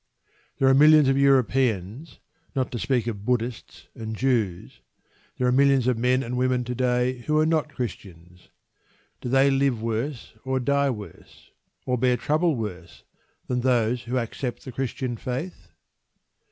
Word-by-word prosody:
There 135 - +2
are 135 - +6
millions 150 +1 +6
of 135 - +2
Europeans 130 - +1 0.4
not 130 -2 -1
to 120 - -4
speak 125 -3 0
of 105 -4 -5
Buddhists 120 0 -3
and 110 -3 -6
Jews 110 -8 -1 0.6
there 125 - 0
are 125 - +3
millions 135 -1 +3
of 125 -1 +2
men 125 +3 +1
and 125 0 -4
women 125 0 +1
to 125 +1 -4
day 125 0 0
who 155 0 +2
are 155 - +4
not 155 -1 +1
Christians. 90 -7 -8 0.7
Do - - -4
they 135 +2 +4
live 135 -3 +1
worse 115 +4 -4
or 130 0 -1
die 140 +2 +1
worse, 105 -5 -9 0.3
or 125 -1 -1
bear 125 0 +2
trouble 155 +3 +1
worse, 95 -7 -7 0.4
than 125 -1 -1
those 120 -1 +1
who 125 +2 -2
accept 120 +1 -4
the 130 - -7
Christian 125 -1 -3
faith? 125 - -5
125 Hz, 155 wpm, -25 LUFS, 115-135 Hz, 0.7 s, are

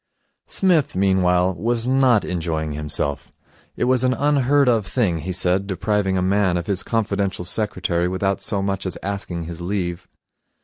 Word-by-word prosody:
Psmith, 175 -7 +2
meanwhile, 95 -1 +2
was 115 +4 -1
not 130 -4 +3
enjoying 80 -3 -2
himself. 75 -1 -2 0.5
It - - -1
was 130 0 +3
an 130 0 +2
unheard 145 -1 +2
of 115 -5 +2
thing, 95 -10 0
he 90 +5 -4
said, 90 +2 +1
depriving 95 0 0
a 90 - 0
man 95 -1 +2
of 85 - -3
his 100 -2 -1
confidential 100 -5 -1
secretary 90 -3 -1
without 95 +2 -1
so 100 0 -1
much 95 -1 -2
as 90 - -1
asking 95 -4 -4
his 85 +1 -7
leave. 90 -1 -3
95 Hz, 160 wpm, -21 LUFS, 90-110 Hz, 0.5 s, not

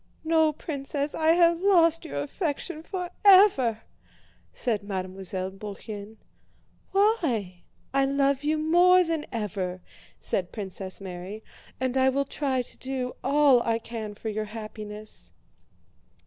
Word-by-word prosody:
"No, 320 -1 +3
Princess, 285 -1 -4
I 320 0 +3
have 340 0 +4
lost 335 -4 +4
your 145 0 -3
affection 310 - -3
forever!" 360 - +4 0.7
said 220 -4 -1
Mademoiselle 190 -1 -4
Bourienne. 205 +1 -8 0.7
"Why? 290 - +1 0.3
I 275 0 +3
love 275 0 +1
you 305 +1 +1
more 350 +4 +5
than 325 -3 -2
ever," 195 -5 -3 0.4
said 180 -2 -2
Princess 190 -2 -5
Mary, 190 +3 -7 0.4
"and 260 0 -1
I 260 0 +4
will 275 +1 0
try 265 -2 -1
to - - -13
do 260 -1 -4
all 275 -2 +5
I 230 -1 +1
can 225 -2 -7
for 220 - -5
your 215 0 -2
happiness." 215 -1 -8
255 Hz, 120 wpm, -26 LUFS, 210-315 Hz, 0.7 s, more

